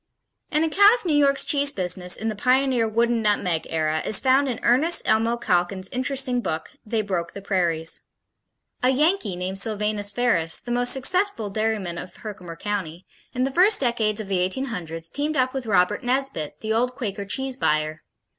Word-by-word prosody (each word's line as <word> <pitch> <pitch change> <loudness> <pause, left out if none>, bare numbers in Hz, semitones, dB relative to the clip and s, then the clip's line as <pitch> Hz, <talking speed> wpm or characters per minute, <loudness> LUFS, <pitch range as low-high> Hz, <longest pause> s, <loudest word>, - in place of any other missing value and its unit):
An 305 +1 +1
account 405 +8 +5
of - - -9
New 315 -4 +1
York's 280 -1 +3
cheese 285 -1 +3
business 180 -4 -2
in 220 - -4
the 215 - -2
pioneer 255 +1 +2
Wooden 230 +1 +1
Nutmeg 185 -6 0
Era 155 -1 0
is 210 - +2
found 270 +1 +3
in 240 - -3
Ernest 300 +9 +3
Elmo 230 +2 +2
Calkins' 185 -2 0
interesting 260 -1 0
book, 160 -7 -4
They 220 0 -1
Broke 175 -4 -3
the 200 - -8
Prairies. 170 -4 0 0.8
A 250 - +3
Yankee 275 - +1
named 185 +2 -4
Silvanus 210 -1 -1
Ferris, 200 -9 +1
"the 240 - -7
most 245 0 +1
successful 275 - +1
dairyman 210 -5 -2
of 180 - -9
Herkimer 190 -6 -8
County," 185 -4 -4 0.3
in 255 0 -1
the 270 - 0
first 390 +8 +5
decades 225 -4 +1
of 215 - -5
the 190 -1 0
1800's 180 - -3
teamed 295 - -2
up 255 0 +1
with 265 -3 -5
Robert 195 0 +2
Nesbit, 250 - -2
"the 220 0 -1
old 250 +3 0
Quaker 205 -5 -4
Cheese 265 +6 -2
Buyer." 155 - 0
220 Hz, 175 wpm, -23 LUFS, 185-265 Hz, 0.8 s, account